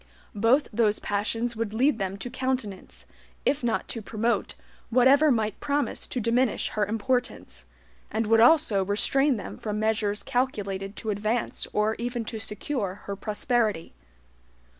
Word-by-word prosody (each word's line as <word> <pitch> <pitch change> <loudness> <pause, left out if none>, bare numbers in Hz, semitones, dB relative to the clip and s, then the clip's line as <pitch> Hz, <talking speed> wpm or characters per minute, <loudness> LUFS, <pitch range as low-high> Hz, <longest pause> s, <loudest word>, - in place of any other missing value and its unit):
Both 230 +8 +3
those 215 -1 +2
passions 225 +4 -1
would 220 -1 -3
lead 250 0 +2
them 195 0 -2
to 240 +5 -6
countenance, 255 -7 -3 0.4
if 280 0 +1
not 230 -2 0
to 230 - -4
promote, 230 +3 -1 0.3
whatever 265 +5 +5
might 220 -5 0
promise 285 0 -1
to 255 - -3
diminish 235 +1 +1
her 210 -2 -1
importance; 220 - -2 0.4
and 225 +1 -1
would 225 +1 +4
also 230 -6 +5
restrain 260 +7 +2
them 200 - -7
from 210 -1 -3
measures 215 -1 0
calculated 205 -7 -2
to 220 - -3
advance 215 +3 -1
or 210 +1 +1
even 240 -1 -3
to 220 0 -5
secure 210 -2 -4
her 200 - -4
prosperity. 210 -3 -1
225 Hz, 140 wpm, -26 LUFS, 205-245 Hz, 0.4 s, whatever